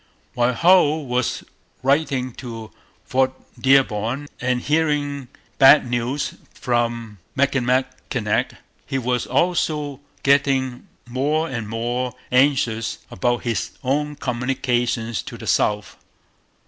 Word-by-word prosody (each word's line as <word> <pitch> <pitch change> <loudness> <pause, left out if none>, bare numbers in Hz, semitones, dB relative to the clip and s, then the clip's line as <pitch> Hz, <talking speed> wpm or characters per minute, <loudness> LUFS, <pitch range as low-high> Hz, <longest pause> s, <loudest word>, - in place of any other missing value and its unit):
While 120 0 +1
Hull 160 -2 +4
was 125 -1 -1 0.4
writing 135 -2 +1
to 115 -4 -7 0.3
Fort 130 0 +1 0.3
Dearborn 130 0 +2
and 125 0 0
hearing 145 -2 0 0.3
bad 135 0 +8
news 120 +4 -1 0.2
from 115 -3 -1 0.2
Michilimackinac, 130 -2 0 0.3
he 135 - -1
was 125 -1 -1
also 150 -5 0 0.2
getting 135 -3 +2 0.2
more 145 +6 0
and 115 -7 -4
more 120 +2 -2 0.2
anxious 125 -4 +2
about 120 +5 0
his 115 -4 -2
own 150 +3 0
communications 120 -3 -1
to - - -9
the - - -9
south. 105 -1 0
130 Hz, 100 wpm, -22 LUFS, 120-140 Hz, 0.4 s, bad